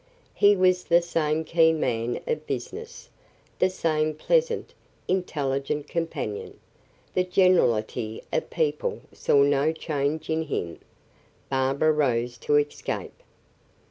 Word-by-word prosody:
He 205 0 +5
was 185 -1 +3
the 170 0 +5
same 160 -2 0
keen 160 -1 +3
man 120 -3 -1
of 470 -2 -3
business, 460 +2 -6 0.5
the 185 - +4
same 155 -4 0
pleasant, 470 - 0 0.3
intelligent 145 -5 -1
companion; 165 -11 -4 0.5
the 185 - +2
generality 120 - +2
of - - -1
people 475 0 -1
saw 140 - +3
no 145 +2 +3
change 155 -1 -2
in 160 0 0
him. 85 - -4 0.7
Barbara 135 +3 +2
rose 120 -5 0
to 145 - +1
escape. 145 0 -3
155 Hz, 110 wpm, -26 LUFS, 140-180 Hz, 0.7 s, He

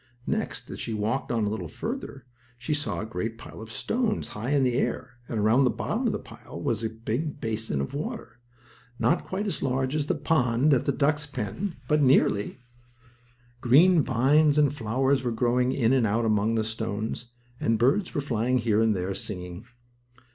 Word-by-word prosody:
Next, - - -2
as - - -7
she 115 - -3
walked 110 +6 -1
on 115 -3 +1
a - - 0
little 105 -5 -4
farther, 215 - -6 0.3
she 125 +5 -2
saw 145 +1 -2
a - - -4
great 110 +2 -4
pile 115 - -10
of 110 0 -9
stones 225 - -1
high 110 +4 -5
in 145 -2 +3
the 125 -1 +2
air, 130 0 -2
and, 115 - -2
around 110 +6 +4
the 130 - +4
bottom - - -1
of - - +2
the - - -1
pile - - -11
was - - -1
a 110 - 0
big 115 +7 -3
basin 110 - -2
of 70 - -4
water, - - -5 0.6
not 170 - +1
quite 195 +3 -2
as 200 - -2
large 130 +1 0
as 150 -1 -1
the - - +1
pond 140 -2 +2
at 130 - +2
the - - +2
ducks' 150 +1 +1
pen, 140 - -4
but 150 0 +3
nearly, 130 -7 +3 1.0
Green 160 +8 +6
vines 145 +4 +3
and 145 -2 +4
flowers 130 +2 +1
were 125 -2 -1
growing 125 +2 +1
in 125 -2 +2
and 125 -4 +3
out 115 +3 +1
among 110 +1 +2
the 110 - +1
stones, 110 +1 -4 0.3
and 115 0 +1
birds 135 - +2
were 145 - +1
flying 125 -2 0
here 110 -3 +2
and 110 -2 +3
there, 95 +1 -2
singing. 90 0 -6
125 Hz, 190 wpm, -27 LUFS, 110-145 Hz, 1.0 s, Green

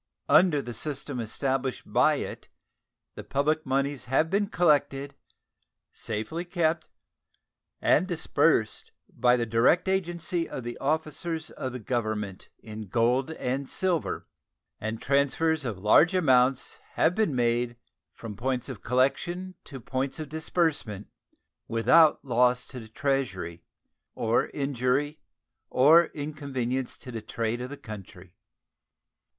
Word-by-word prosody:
Under 155 -7 +5
the 120 - -6
system 140 +1 -3
established 130 +3 -2
by - - +3
it - - -6 0.6
the - - -8
public 155 +2 0
moneys 140 +1 -1
have 135 +6 +1
been 200 +1 +2
collected, 145 -6 +1 0.8
safely 115 +11 -4
kept, 170 -3 -1 0.9
and 180 +5 +3
disbursed 165 - +1
by 125 0 +3
the 120 -1 0
direct 115 - +3
agency 175 -3 -1
of 120 -2 -6
officers 160 +2 -2
of 130 - -5
the 125 - -5
Government 110 -4 -3
in 110 -1 -9
gold 120 - +1
and 135 -2 -3
silver, 180 -4 -1 0.5
and 110 +1 -4
transfers 140 +3 +1
of 110 -6 -3
large 110 - +5
amounts 130 -6 +2
have 160 - +3
been 195 -9 +1
made 120 0 0 0.3
from 110 -3 -8
points 125 +2 -2
of - - -7
collection 175 +9 0
to 135 -3 -8
points 130 +3 -3
of 155 -3 -6
disbursement 155 - -1 0.6
without 150 +8 +4
loss 125 0 +2
to 130 - -8
the 110 - -10
Treasury 105 -10 -2 0.5
or 115 +1 +1
injury 140 +2 -1 0.5
or 160 +6 +6
inconvenience 140 -5 -4
to 125 - -10
the 115 -2 -5
trade 115 +2 -3
of 125 - -5
the 145 - -7
country. 95 -5 -11
135 Hz, 120 wpm, -27 LUFS, 120-155 Hz, 0.9 s, or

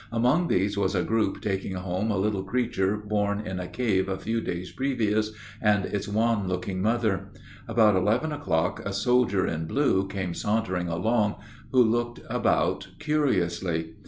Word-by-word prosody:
Among 125 +9 +2
these 100 - +1
was 100 - +1
a 90 - +2
group 110 -3 0
taking 95 -2 -2
home 95 +3 -2
a 105 - +1
little 100 0 0
creature 100 -2 0
born 105 -1 -1
in 95 0 -4
a 90 - -4
cave 95 -6 0
a 95 - -1
few 115 +4 -2
days 90 -3 -4
previous, 110 -5 0 0.3
and 105 -2 +3
its 100 0 -3
wan 110 -1 +1
looking 95 +1 -2
mother. 105 -3 0 0.4
About 110 -3 +4
eleven 110 +12 +1
o'clock 100 - 0
a 100 - -3
soldier 120 -3 +2
in 80 0 -2
blue 95 - +2
came 95 -3 -3
sauntering 95 -3 -1
along, 105 +5 +1 0.4
who 130 -1 +6
looked 120 +1 0
about - - +1
curiously. 90 - 0
100 Hz, 160 wpm, -26 LUFS, 95-115 Hz, 0.4 s, who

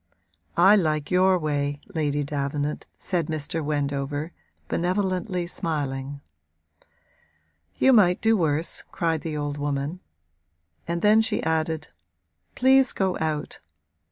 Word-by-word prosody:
'I 195 +5 +7
like 155 -4 0
your 185 +1 +4
way, 145 -3 -2
Lady 145 -3 0
Davenant,' 145 +1 -3
said 170 -5 -2
Mr. 155 +1 -2
Wendover, 145 +1 -2 0.4
benevolently, 185 +1 -1
smiling. 140 -5 -3 1.6
'You 265 - +5
might 185 -5 +5
do 225 0 +3
worse,' 160 -3 0
cried 165 -2 -1
the 155 -2 -4
old 145 0 -3
woman; 145 +4 -2 0.9
and 170 0 -2
then 215 +1 +6
she 225 -1 -1
added: 160 0 -1 0.7
'Please 265 +1 +5
go 190 -2 0
out!' 155 -2 -3
160 Hz, 110 wpm, -25 LUFS, 145-180 Hz, 1.6 s, I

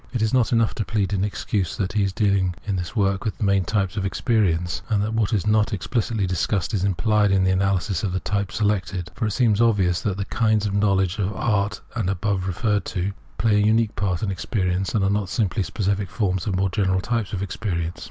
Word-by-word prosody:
It 120 -3 0
is 110 - 0
not 125 -3 +3
enough 115 -2 +2
to 110 - -2
plead 105 -2 -1
in 95 -1 +1
excuse 100 -2 -2
that 95 -1 -2
he 105 - +1
is 100 -1 +1
deahng 100 -4 +1
in 100 - -1
this 90 +2 -4
work 100 -2 +1
with 110 - -3
the - - -3
main 100 -1 +3
types 100 -1 -1
of 100 - 0
experience, 95 -5 0
and 105 -2 +2
that 110 +1 -2
what 110 -3 +1
is 105 -4 0
not 105 0 +2
ex 100 - -3
pHcitly 115 -4 0
discussed 95 +3 -1
is 95 -3 0
imphed 105 +2 +2
in 95 -1 +3
the 95 - +3
analyses 95 -2 +1
of 100 - 0
the 95 - -1
types 100 +2 -2
selected; 100 -4 -1
for 110 -1 -2
it - - -1
seems 110 -1 +2
obvious 100 -7 +2
that 100 -3 -2
the 100 - -2
kinds 110 -1 +1
of 100 - -1
know 100 -1 +3
ledge 95 +1 0
and 100 - +1
of 105 - -7
art 105 -1 0
above 100 -2 -1
referred 105 +1 0
to 95 +2 -2 0.3
play 110 -2 +3
a 105 - +3
unique 110 0 +2
part 95 -3 -1
in 100 - 0
experience, 95 0 -1
and 105 - +2
are 95 - +2
not 100 -2 -1
simply 105 0 0
specific 100 +1 -1
forms 95 -4 -1
of 95 - 0
more 95 0 +1
general 95 0 +1
types 115 0 -2
of 100 -1 -2
experience. 90 -4 -3
100 Hz, 240 wpm, -23 LUFS, 95-105 Hz, 0.3 s, not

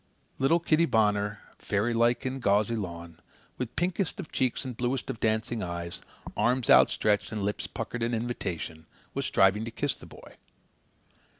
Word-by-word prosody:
Little 155 +6 +4
Kitty 165 0 +3
Bonner, 105 -3 +1 0.2
fairylike 115 +4 +1
in 130 +1 -2
gauzy 105 0 +2
lawn, 85 -5 -6 0.4
with 125 -1 -4
pinkest 180 +2 -1
of 175 - -7
cheeks 130 +1 0
and 125 -2 -5
bluest 125 +2 -1
of 110 - -8
dancing 110 +1 0
eyes, 85 -1 -4 0.3
arms 120 +3 +2
outstretched 105 -1 +4
and 105 -2 -3
lips 105 +1 -2
puckered 120 - -5
in 115 +1 0
invitation, 90 -9 -4 0.3
was - - -1
striving 95 +3 +4
to 115 - -4
kiss 140 +4 -1
the - - -13
boy. - - -14
115 Hz, 155 wpm, -28 LUFS, 100-125 Hz, 0.4 s, Little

